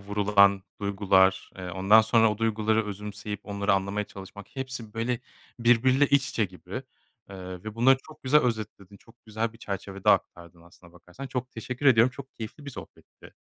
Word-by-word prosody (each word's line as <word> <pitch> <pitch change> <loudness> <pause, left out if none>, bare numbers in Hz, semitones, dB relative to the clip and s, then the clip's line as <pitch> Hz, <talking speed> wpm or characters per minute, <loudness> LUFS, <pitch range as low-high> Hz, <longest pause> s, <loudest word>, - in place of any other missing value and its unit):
vurulan 100 -1 +3 0.2
duygular, 95 -2 +2
eee, 90 -1 -6
ondan 95 +5 +5
sonra 110 0 +3
o 105 - -8
duyguları 110 -1 +1
özümseyip 105 0 -6
onları 100 -1 -1
anlamaya 100 +2 0
çalışmak, 95 +1 -11
hepsi, 130 -5 -6
böyle, 115 +1 -2 0.4
birbiriyle 125 +4 +4
iç 140 -1 +2
içe 110 - 0
gibi, 90 0 -11 0.6
eee, 95 - -9 0.3
ve 110 -1 -6
bunları 130 +4 +5
çok 155 - -16
güzel 145 +3 +4
özetledin. 110 -5 -4
Çok 115 +4 -23
güzel 110 +1 -3
bir 115 - -17
çerçevede 100 -2 -2
aktardın 85 -1 -1
aslında 85 0 -19
bakarsan. 90 +10 -11
Çok 125 -1 -4
teşekkür 125 +5 -4
ediyorum. 120 -1 +6
Çok 135 +1 -11
keyifli 115 +6 -9
bir 140 - -6
sohbetti. - - -13
105 Hz, 165 wpm, -27 LUFS, 100-120 Hz, 0.6 s, ediyorum